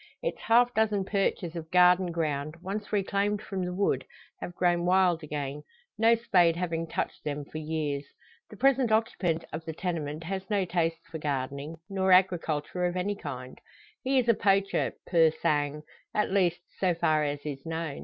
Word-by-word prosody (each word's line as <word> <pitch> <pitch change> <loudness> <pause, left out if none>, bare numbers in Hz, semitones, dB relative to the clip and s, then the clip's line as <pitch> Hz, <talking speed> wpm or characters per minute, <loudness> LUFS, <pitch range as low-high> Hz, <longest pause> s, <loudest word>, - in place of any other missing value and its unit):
Its - - -2
half 245 +2 +4
dozen 210 -3 +1
perches 195 -4 -1
of 160 -1 -6
garden 180 0 +5
ground, 155 -2 -2
once 200 +3 -4
reclaimed 200 0 0
from 195 -2 -4
the 180 - -2
wood, 180 -8 0 0.4
have 175 - -7
grown 175 -1 +2
wild 180 -2 +3
again, 145 -2 -4 0.3
no 225 +1 +5
spade 180 -8 +3
having 165 -2 -2
touched - - -3
them 145 -1 -3
for 155 - -7
years. 150 -2 -2 0.5
The 210 - -12
present 265 -2 +3
occupant 205 -7 +1
of 160 - -4
the 160 - -4
tenement 160 -3 -3
has 190 +3 -5
no 200 -3 +1
taste 165 -2 -1
for 160 - -5
gardening, 140 +1 -3
nor 190 -1 0
agriculture 180 -2 +2
of 175 +1 -3
any 200 +3 -1
kind; 130 -8 -8 0.4
he 265 +1 +2
is 250 -2 +2
a 230 - +6
poacher, 195 -1 +1
pur 165 -2 +5
sang 150 -1 -1 0.3
at 210 - +1
least, 180 -3 +2 0.2
so 180 -3 +2
far 155 -2 +2
as 145 0 -3
is 140 -2 -5
known. 160 -3 -4
175 Hz, 175 wpm, -28 LUFS, 155-195 Hz, 0.5 s, a